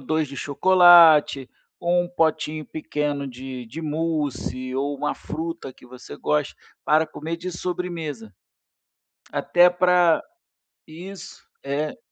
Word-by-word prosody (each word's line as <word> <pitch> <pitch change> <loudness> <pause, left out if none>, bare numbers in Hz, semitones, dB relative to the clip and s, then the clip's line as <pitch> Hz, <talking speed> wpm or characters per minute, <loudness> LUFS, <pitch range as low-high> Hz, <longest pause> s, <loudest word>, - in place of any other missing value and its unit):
2 155 +3 -1
de 140 0 -10
chocolate, 160 -3 +5 0.3
ou 175 0 +1
um - - -8
potinho 160 -2 -1
pequeno 145 -2 -3
de 130 -1 -8
de 150 +9 -8
mousse, 145 -5 -3
ou 140 +2 -2
uma 150 +2 -2
fruta 160 -4 -6
que 125 - -19
você 125 0 -11
goste, 150 -2 -1 0.3
para 155 +3 +3
comer 160 +2 -6
de 180 +2 -6
sobremesa. 165 - -5 1.0
Até 175 0 +4
pra 180 -2 +3 0.6
isso. 180 +5 -11 0.2
É. 145 +2 -3
155 Hz, 120 wpm, -23 LUFS, 140-170 Hz, 1.0 s, chocolate